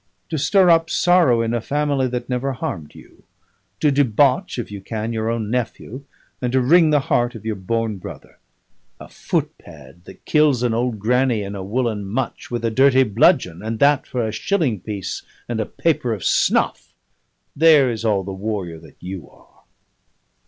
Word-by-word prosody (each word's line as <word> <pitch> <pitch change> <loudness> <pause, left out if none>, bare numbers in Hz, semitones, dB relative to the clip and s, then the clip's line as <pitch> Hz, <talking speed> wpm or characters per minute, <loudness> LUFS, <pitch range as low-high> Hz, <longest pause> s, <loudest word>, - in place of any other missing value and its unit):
to 160 - -3
stir 185 +6 +3
up 165 -1 +4
sorrow 170 -10 +3
in 115 +1 -2
a 120 - -1
family 140 0 0
that 125 -1 -4
never 130 +2 -2
harmed 80 -11 -6
you, - - -17 0.6
to 150 - +3
debauch 135 -1 +2
(if 120 -4 -5
you 100 -1 -7
can) 110 +3 -4
your 110 0 -2
own 115 -2 -2
nephew, 125 +1 -4 0.4
and 125 -1 -1
to 130 - +2
wring 160 +6 +5
the 150 -2 +3
heart 120 -2 0
of 110 - -10
your 110 - -1
born 110 +2 -2
brother! 90 - -11 0.6
A - - -10
footpad 80 +1 -6
that 95 - -15
kills 150 -5 +3
an 120 -2 +1
old 120 0 -1
granny 120 +1 +1
in 100 0 -6
a 100 - -6
woollen 110 0 -2
mutch 115 +6 -4
with 120 -1 -3
a 115 - 0
dirty 130 +2 +4
bludgeon, 105 - +2
and 110 +1 -4
that 140 +2 +3
for 120 -3 -2
a - - -3
shilling 130 - -1
piece 100 -1 -5 0.3
and 120 -2 -3
a 110 - -2
paper 145 -8 0
of 100 - -6
snuff - - +1 0.6
there 150 -4 +5
is 115 -1 -5
all 105 -4 +1
the 95 - -6
warrior 95 -4 -4
that 80 -2 -17
you 90 -1 -7
are." - - -25
120 Hz, 180 wpm, -20 LUFS, 105-135 Hz, 0.6 s, wring